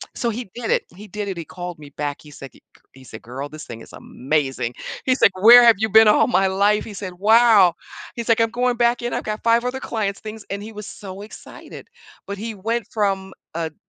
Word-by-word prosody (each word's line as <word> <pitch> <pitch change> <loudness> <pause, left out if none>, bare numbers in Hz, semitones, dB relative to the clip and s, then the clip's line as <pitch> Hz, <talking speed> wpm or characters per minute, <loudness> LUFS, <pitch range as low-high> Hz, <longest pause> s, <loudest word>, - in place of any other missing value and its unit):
So 240 -3 -1
he 235 +2 -5
did 240 -1 -3
it. - - +1
He 210 +2 -12
did 205 +1 -5
it, 195 - -4
he 170 - -5
called 175 +1 -8
me 145 -1 -12
back, 145 0 -5
he 150 - -15
said 135 -1 -11
g - - -21 0.2
c - - -30
he 130 - -16
said, 110 -3 -11
"Girl, 135 +4 -7
this 155 0 -10
thing 115 -1 -9
is - - -14
amazing." 135 -3 -3 0.3
He's 260 0 +1
like, 190 - +5
"Where 240 +3 +9
have 230 -1 +7
you 220 +1 0
been 220 +1 +7
all 210 - +4
my 195 -6 +2
life?" 200 +2 +1
He 215 - -9
said, 190 -2 -6
"Wow." 215 -4 +5 0.4
He's 235 -1 -6
like, 230 0 +4
"I'm 225 -1 +1
going 245 0 0
back 240 0 +2
in, 240 0 -3
I've - - -3
got 215 0 -4
5 235 +1 +3
other 250 +1 -3
clients, 205 -3 -3
things," 215 0 -9
and 200 +1 -5
he 220 - -9
was 210 -1 -8
so 195 -1 -9
excited. 215 - -12 0.4
But 200 0 -5
he 225 +1 -6
went 225 +3 -3
from 195 -3 -1 0.2
a 165 -1 -2
d - - -35
205 Hz, 245 wpm, -21 LUFS, 175-230 Hz, 0.4 s, Where